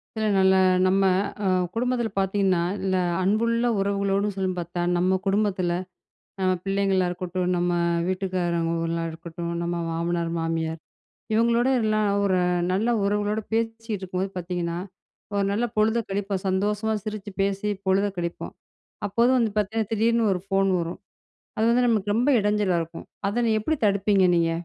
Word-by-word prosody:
சில 220 0 -1
நாள்ல 190 0 +4 0.3
நம்ம, 195 +1 +3 0.4
அ - - +1 0.3
குடும்பத்தில 240 0 0
பார்த்தீங்கன்னா, 190 -2 +1 0.2
இந்த 190 -1 +1 0.2
அன்புள்ள 230 +4 +1
உறவுகளோடு 200 0 0
சொல்லி 190 -1 -1
பார்த்தா, 175 +1 -4 0.2
நம்ம 185 +2 +2
குடும்பத்தில, 195 -3 +1 0.7
நம்ம 185 0 +2
பிள்ளைங்களா 195 -1 +1
இருக்கட்டும், 180 0 -3
நம்ம 175 0 +1 0.4
வீட்டுக்காரவங்களா 170 -3 -1
இருக்கட்டும், 170 +1 -6
நம்ம 170 0 -2 0.2
மாமனார், 170 0 -1
மாமியார், 165 0 -2 0.5
இவங்களோட 235 +2 +3
எல்லாம் 215 -1 +1 0.2
ஒரு 190 -2 +2 0.3
நல்ல 205 +5 +1 0.2
உறவுகளோடு 210 +1 0
பேசிகிட்டு 225 -2 -2
இருக்கும்போது 185 +1 -3
பார்த்தீங்கன்னா 175 -1 -3 0.6
ஒரு 200 - +2
நல்ல 220 +4 0
பொழுத 220 +2 +3
கழிப்போம். 195 -1 -2
சந்தோஷமா 210 +3 0
சிரிச்சு 210 -1 -5
பேசி, 200 +1 -1 0.2
பொழுத 195 +2 +3
கழிப்போம். 170 0 -4 0.5
அப்போது 235 +5 +2
வந்து 230 -2 +1
பார்த்தீங்கன்னா, 215 +1 -1
திடீர்னு 225 +1 +2
ஒரு 180 - -1
ஃபோன் 195 -1 +2
வரும். 170 +2 -4 0.6
அது 220 - +2
வந்து 245 +1 +3
நமக்கு 210 -3 +1
ரொம்ப 245 +5 +2
இடஞ்சலா 205 -3 +1
இருக்கும். 165 - -8 0.2
அதை 230 - -1
நீங்க 220 -1 +2
எப்படி 315 +4 0
தடுப்பீங்க 200 -1 +3
நீங்க? 165 -1 +2
195 Hz, 140 wpm, -25 LUFS, 180-215 Hz, 0.7 s, நாள்ல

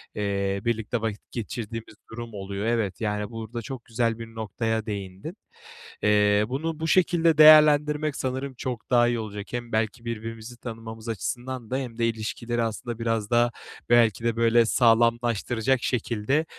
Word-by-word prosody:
eee, 100 -1 -1
birlikte 115 0 -1
vakit 110 -2 -5
geçirdiğimiz 115 -1 -6 0.2
durum 115 -1 -7
oluyor. 100 +1 -5
Evet, 115 -4 -1
yani, 105 -1 -2
burada 115 +1 -6
çok 130 +1 -8
güzel 115 -1 -1
bir 115 0 -9
noktaya 110 +1 -2
değindin. 100 - -6 0.7
Iıı, 105 +1 +3
bunu 155 +4 -3
bu 160 - -2
şekilde 170 -3 +3
değerlendirmek 150 -1 +6
sanırım 130 +1 -3
çok 125 -2 -5
daha 120 -1 +5
iyi 120 -1 0
olacak. 105 -1 -6
Hem 120 -1 -5
belki 110 +2 -1
birbirimizi 115 +1 -6
tanımamız 115 -1 -8
açısından 120 +3 -4
da 130 - +1
hem 125 -4 -5
de 115 0 +2
ilişkileri 115 +1 -2
aslında 115 +1 -4
biraz 115 -2 -1
daha 120 0 +4 0.4
belki 115 -2 +4
de, 115 -1 +1
böyle, 115 0 +4
sağlamlaştıracak 120 +1 +2
şekilde, 125 +5 0
115 Hz, 150 wpm, -26 LUFS, 110-125 Hz, 0.7 s, değerlendirmek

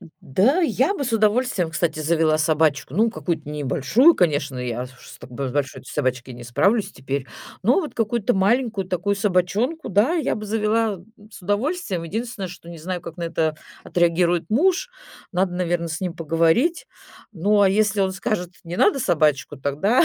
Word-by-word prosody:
Н-да, 190 - 0
я 270 - +2
бы 290 - -3
с 240 - -3
удовольствием, 215 -5 +1
кстати, 160 -1 -1
завела 155 0 +2
собачку. 155 -3 +1
Ну, 225 +4 +3
какую-то 165 -9 -4
небольшую, 150 - +3
конечно, 145 -6 0
я 125 0 -3
с 125 - -15
уж, 120 - -21
чтобы 130 +2 -7
с - - -6
большой-то 140 0 -3
собачкой 130 -3 -2
не 120 0 -10
справлюсь 195 - +1
теперь. 135 +1 -4 0.4
Но 235 +7 +4
вот 310 - -6
какую-то 230 +1 0
маленькую 205 0 +1
такую 195 +2 0
собачонку, 200 - 0
да, 210 - +3
я 330 - 0
бы 215 - -6
завела, 220 0 +1
м, 210 +3 -17
с 200 - -13
удовольствием. 205 - -1
Единственное, 220 +1 -4
что 170 -1 -12
не 170 -1 -9
знаю, 180 +3 -4
как 170 -2 -9
на 170 - -4
это 160 -2 0 0.3
отреагирует 175 0 +2
муж, 370 - +2 0.4
надо, 185 -1 0
наверно, 175 -2 -1
с 160 - -4
ним 180 -3 -3
поговорить. 165 - +1 0.5
Ну, 205 +3 +2
а 200 - +6
если 205 +1 +2
он 190 -1 +1
скажет: 190 -2 -2
"Не 170 +1 -6
надо 410 - +3
собачку"- 150 - +1
тогда 150 - +2
180 Hz, 175 wpm, -22 LUFS, 155-220 Hz, 0.5 s, а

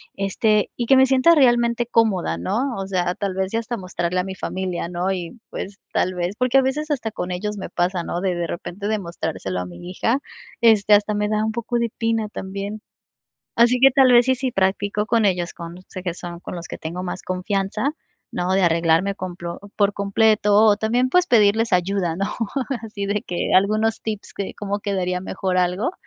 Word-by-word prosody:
este, 205 +2 +1
y 240 - -2
que 265 +3 +5
me 265 - +7
sienta 265 +5 +5
realmente 240 -4 +3
cómoda, 215 - +1
¿no? 235 - -1
O 195 - -4
sea, 180 -2 0
tal 195 -2 -3
vez, 190 +2 -2
y - - +1
hasta 230 +1 -3
mostrarle 180 -1 -2
a 180 - -1
mi 190 -1 -6
familia, 180 -1 -3
¿no? 180 +2 -1
Y 180 +5 -6
pues, 195 0 -7
tal 185 - +1
vez 180 +2 -3
porque 255 +1 +3
a - - +7
veces 295 +4 -2
hasta 235 -6 -2
con 180 -3 -4
ellos 210 +4 -3
me 195 - -6
pasa, 175 0 -1
¿no?, 175 - -3
de 185 -1 -1
de 175 -1 -2
repente 200 +5 -5
de 215 - 0
mostrárselo 160 - -4
a 90 - -4
mi 90 - -10
hija, 230 +7 0 0.4
este, 215 -3 +5
hasta 205 +1 +4
me 210 0 0
da 215 0 +1
un 220 - -2
poco 235 +1 -2
de 235 -1 0
pena 225 -1 0
también. 200 +2 -6 0.7
Así 240 +2 +4
que 270 0 +8
tal 265 0 +5
vez 240 +1 +6
y 260 - +5
si 260 0 -2
practico 200 +1 0
con 230 -2 +3
ellos, 180 -3 0
con, 170 0 -8
no 180 - -13
sé, 185 - -7
que 175 -2 -3
son 175 -1 -8
con - - -7
los 170 - -8
que - - -7
tengo 170 +3 -5
más 185 0 -4
confianza, 195 +7 -1 0.4
¿no? 180 +1 -1
De 195 - +3
arreglarme 170 +3 +2
complo 175 -2 -6 0.2
por 205 -1 +3
completo, 205 +1 +2
o 210 - +6
también, 240 +4 +1
pues, 360 +6 +3
pedirles 225 0 +4
ayuda, 180 -2 +1
¿no?, 195 - -1 0.6
así 210 -3 -5
de 205 +1 -1
que 175 - -3
algunos 215 +3 +2
tips 215 -2 -5
que 200 - -5
cómo 205 0 -3
quedaría 180 -3 -1
mejor 190 0 -2
algo. 180 - +1
200 Hz, 210 wpm, -22 LUFS, 180-225 Hz, 0.7 s, que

